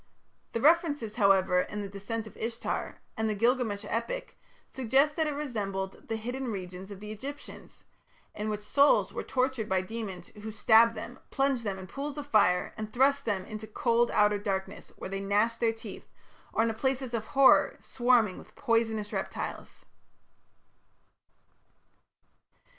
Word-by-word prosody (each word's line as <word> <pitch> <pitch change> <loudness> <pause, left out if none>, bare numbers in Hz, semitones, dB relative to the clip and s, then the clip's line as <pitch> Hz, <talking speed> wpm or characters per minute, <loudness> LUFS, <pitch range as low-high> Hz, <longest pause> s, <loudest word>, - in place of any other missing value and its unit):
The 230 - -1
references, 295 -7 +3
however, 195 -3 +4
in 210 +2 -5
the - - -4
"Descent 205 +3 -5
of 215 - -12
Ishtar" 230 +1 -4
and 220 0 0
the 215 - -1
Gilgamesh 225 -2 +1
epic 230 - -3 0.3
suggest 265 +4 +2
that 320 -1 +1
it 295 - -2
resembled 200 -9 -4
the 225 - -2
hidden 245 +3 -4
regions 185 -1 -6
of 200 -2 -9
the 210 0 -7
Egyptians, 275 +7 -9 0.5
in 210 +1 -3
which 210 0 -3
souls 280 +7 +4
were - - -3
tortured 255 -4 -1
by 190 -1 +2
demons 190 -3 -6
who 215 +1 -8
stabbed 225 +1 +5
them, 240 +4 -7
plunged 270 -3 +1
them 200 -3 -2
in 190 - -8
pools 280 +8 -5
of 290 - -4
fire, 180 -8 +3
and 215 0 -5
thrust 275 +3 +3
them 195 -4 -1
into 215 0 -7
cold 235 +2 +2
outer 210 -1 +3
darkness 195 -2 -4
where - - -6
they 195 - -2
gnashed 210 +4 +1
their 230 -1 +3
teeth, 225 0 -10 0.4
or 225 - +2
into 230 -1 +1
places 260 +1 -1
of 220 -2 -2
horror 275 -1 +6
swarming 240 -6 +2
with - - -16
poisonous 225 -4 0
reptiles. - - -5
225 Hz, 155 wpm, -29 LUFS, 205-255 Hz, 0.5 s, horror